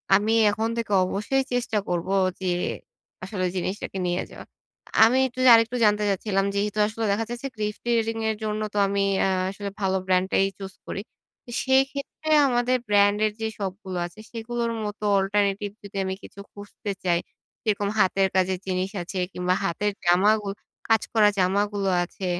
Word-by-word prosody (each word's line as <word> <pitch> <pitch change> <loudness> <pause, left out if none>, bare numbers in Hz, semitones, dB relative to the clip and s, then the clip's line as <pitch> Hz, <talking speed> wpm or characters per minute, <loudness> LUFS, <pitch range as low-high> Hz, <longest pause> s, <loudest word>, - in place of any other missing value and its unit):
আমি 210 +3 +2 0.2
এখন 220 +2 -1
থেকে 230 -2 -3
অবশ্যই 210 +9 0
চেষ্টা 245 -3 0
করবো 175 +2 -1 0.3
যে 190 - -3 0.8
আসলে 185 -1 -2
জিনিসটাকে 190 +2 -3
নিয়ে 175 +1 -1
যাওয়া। - - -10 0.6
আমি 240 +3 +3
একটু 255 0 -11
আরেকটু 230 +1 +4
জানতে 210 0 +3
চাচ্ছিলাম 195 0 0
যেহেতু 210 +1 -1
আসলে 225 +1 -3
দেখা 225 +3 0
যাচ্ছে 240 +3 -4
ক্লিফট 210 -1 -3 0.2
রিডিং 225 0 -1
এর 220 - 0
জন্য 215 0 -2
তো - - -3
আ - - +4
আমি 200 0 0 0.5
আসলে 200 +1 -6
ভালো 190 -1 +1
ব্র্যান্ডটাই 185 +1 +2
চুজ 195 -1 -7
করি 195 - -4 0.6
সেক্ষেত্রে 270 +3 0 0.2
আমাদের 250 0 +2
ব্র্যান্ডের 205 +1 +3
যে 220 - 0
সপগুলো 190 -1 -5
আছে 175 +4 -11
সেগুলোর 235 0 -3
মতো 210 +1 -6 0.2
অল্টারনেটিভ 200 +1 0
যদি 200 0 -8
আমি 190 0 -2
কিছু - - -12
খুঁজতে 205 0 -7
চাই 170 -1 +3 0.4
যেরকম 205 -2 0
হাতের 190 0 +3
কাজের 185 0 +2
জিনিস 185 0 -1
আছে 185 +3 -7 0.2
কিংবা 180 0 0
হাতের 205 +5 0
জামাগুলো 200 +3 +3 0.3
কাজ 225 -1 +4
করা 215 -2 +5
জামাগুলো 200 +1 +1
আছে, 185 +2 -7
205 Hz, 155 wpm, -25 LUFS, 190-220 Hz, 0.8 s, করা